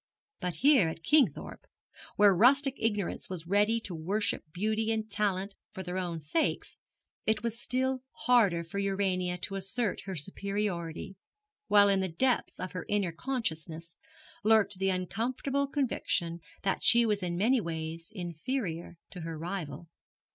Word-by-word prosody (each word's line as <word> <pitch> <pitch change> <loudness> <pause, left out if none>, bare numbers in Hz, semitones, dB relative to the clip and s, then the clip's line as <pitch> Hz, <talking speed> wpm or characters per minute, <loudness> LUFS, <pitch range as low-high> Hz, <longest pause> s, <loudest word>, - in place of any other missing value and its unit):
But 180 -1 -2
here 270 - +5
at 165 +1 -8
Kingthorpe, 300 - +2 0.5
where 205 -1 +6
rustic 270 +7 +5
ignorance 210 -4 -1
was 180 -3 -5
ready 205 +5 +3
to 195 - -6
worship 170 0 -2
beauty 215 +5 0
and 220 -1 -1
talent 200 -1 0 0.2
for 190 -3 -5
their 180 +1 -3
own 175 -3 -3
sakes, 160 - -1 0.5
it 220 0 +1
was 235 0 -2
still 260 +1 0 0.2
harder 205 -9 +4
for 170 +4 -5
Urania 190 -2 0
to 190 +2 -4
assert 195 +2 -1
her 190 -1 -4
superiority; 190 0 -3 0.5
while 205 -1 +6
in 195 -1 +3
the 190 -1 -1
depths 245 +9 0
of 185 - -4
her 180 - -6
inner 205 -4 +1
consciousness 165 - -4 0.5
lurked 215 -3 +4
the 195 0 +2
uncomfortable 235 +10 -1
conviction 230 - -1 0.2
that 195 - 0
she 235 0 +6
was 210 -2 +1
in 175 -1 -2
many 235 +6 +3
ways 165 -1 -5
inferior 175 - -4
to 180 - -7
her 165 0 -5
rival. 170 -1 -5
195 Hz, 145 wpm, -30 LUFS, 175-225 Hz, 0.5 s, where